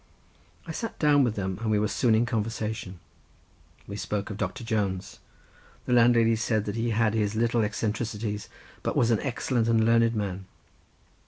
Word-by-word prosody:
I 165 - -6
sat 225 +7 -5
down 145 -2 +4
with 115 -4 0
them 95 -1 -3
and 115 - -1
we 105 - +3
were 105 +1 +1
soon 115 +1 +2
in 115 +2 +3
conversation. 110 -5 -3 0.9
We 100 - -7
spoke 105 0 -3
of 100 - -6
Doctor 130 +3 -3
Jones—the 100 +2 -5
landlady 115 -1 +5
said 110 -1 0
that 105 - -3
he 115 +1 -1
had 110 -1 +2
his 105 -1 0
little 115 +1 +2
eccentricities, 105 0 -3 0.3
but - - -2
was 120 -1 +3
an 110 - +3
excellent 120 -2 -1
and 115 -1 +3
learned 115 0 +3
man. 95 -3 -3
110 Hz, 165 wpm, -27 LUFS, 105-115 Hz, 0.9 s, landlady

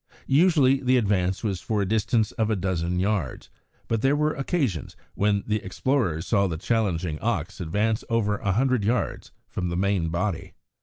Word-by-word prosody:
Usually 140 -3 +4
the 130 0 +3
advance 95 -4 0
was 100 -5 -2
for 110 -2 -1
a 100 - +1
distance 110 +1 +1
of 110 -1 -1
a 110 - +2
dozen 90 -2 -1
yards, 95 -7 -2 0.4
but 115 -2 0
there 135 +3 +3
were 150 +1 +1
occasions 135 - -2 0.2
when 100 0 +1
the 105 0 0
explorers 95 - -1
saw 100 -3 +2
the 85 -3 -3
challenging 90 -6 -1
ox 100 -4 -2
advance 105 +6 0
over 105 -3 +1
a 100 - 0
hundred 125 0 +2
yards 115 +4 -1 0.2
from 90 -1 -3
the 85 - -2
main 95 -3 +1
body. 85 +1 -3
105 Hz, 170 wpm, -25 LUFS, 90-120 Hz, 0.4 s, Usually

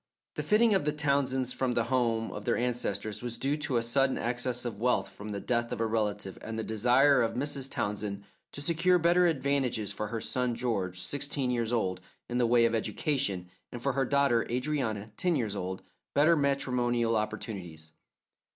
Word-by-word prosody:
The - - -3
flitting 220 +1 +4
of 190 - +2
the 150 - +1
Townsends 140 -4 0
from 125 -2 -1
the 115 - +2
home 115 -2 0
of - - -6
their 120 - +1
ancestors 120 -4 -2
was 120 -1 -4
due 135 +4 0
to 145 -5 -1
a 115 - +1
sudden 135 +3 +2
access 125 +1 -2
of 110 -4 -4
wealth 125 -4 +1
from 100 +2 -9
the 100 -1 -3
death 120 +2 -1
of - - -3
a 115 - +1
relative 105 -3 -2
and 110 0 -5
the 110 - -1
desire 125 +6 +4
of 115 -1 0
Mrs. 135 0 -1
Townsend 100 -1 -3 0.3
to 145 - -7
secure 170 +4 +3
better 175 +1 +4
advantages 135 - 0
for 105 +1 -4
her 115 +2 -3
son 125 +1 -1
George, 100 -7 -2
sixteen 140 +5 -1
years 120 -2 -1
old, 95 -6 0 0.3
in 120 +1 -1
the 120 - +3
way 120 0 +5
of 115 - +1
education, 110 -6 -1 0.2
and 120 - -6
for 140 - +1
her 135 - +1
daughter 140 -4 +3
Adrianna, 125 -5 -2
ten 180 -2 +1
years 110 -7 -1
older, 95 -1 -4 0.3
better 155 +4 +5
matrimonial 125 -5 +1
opportunities. 90 -7 -5
120 Hz, 190 wpm, -30 LUFS, 110-140 Hz, 0.3 s, way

